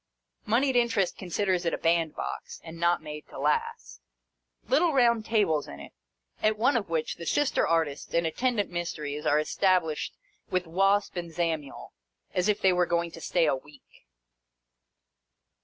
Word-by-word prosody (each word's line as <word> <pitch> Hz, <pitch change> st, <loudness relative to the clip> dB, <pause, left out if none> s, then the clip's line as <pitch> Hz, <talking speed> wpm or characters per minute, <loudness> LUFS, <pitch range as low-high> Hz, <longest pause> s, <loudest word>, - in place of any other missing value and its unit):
Mouied 255 Hz, +5 st, +2 dB
Interest 235 Hz, -6 st, +2 dB
considers 185 Hz, 0 st, -1 dB
it 170 Hz, -, 0 dB
a -, -, -6 dB
bandbox, 165 Hz, -, -1 dB
and 165 Hz, 0 st, -10 dB
not 170 Hz, +1 st, +2 dB
made 150 Hz, 0 st, -8 dB
to -, -, -11 dB
last. 460 Hz, 0 st, -2 dB, 0.7 s
Little 350 Hz, -10 st, +3 dB
round 235 Hz, -4 st, +3 dB
tables 200 Hz, -10 st, +1 dB
in 70 Hz, -, -9 dB
it, -, -, -10 dB, 0.5 s
at 215 Hz, 0 st, +2 dB
one 250 Hz, +6 st, +3 dB
of 205 Hz, -6 st, -1 dB
which 160 Hz, -2 st, -2 dB
the 170 Hz, -, -7 dB
Sister 290 Hz, -, +2 dB
Artists 160 Hz, -4 st, 0 dB
and 170 Hz, 0 st, +2 dB
attendant 210 Hz, +4 st, 0 dB
Mysteries 150 Hz, -3 st, -4 dB
are 150 Hz, -, +4 dB
established 165 Hz, 0 st, +1 dB, 0.3 s
with 185 Hz, 0 st, 0 dB
Wasp 195 Hz, +3 st, +1 dB
and 170 Hz, -1 st, -4 dB
Zamiel, 160 Hz, -4 st, -3 dB, 0.4 s
as 180 Hz, +3 st, +1 dB
if 210 Hz, 0 st, +1 dB
they 190 Hz, -1 st, +5 dB
were 180 Hz, -1 st, +2 dB
going 170 Hz, 0 st, 0 dB
to 165 Hz, -, -11 dB
stay 170 Hz, 0 st, +1 dB
a 150 Hz, -, +2 dB
week. 140 Hz, +1 st, -16 dB
175 Hz, 155 wpm, -28 LUFS, 160-215 Hz, 0.7 s, they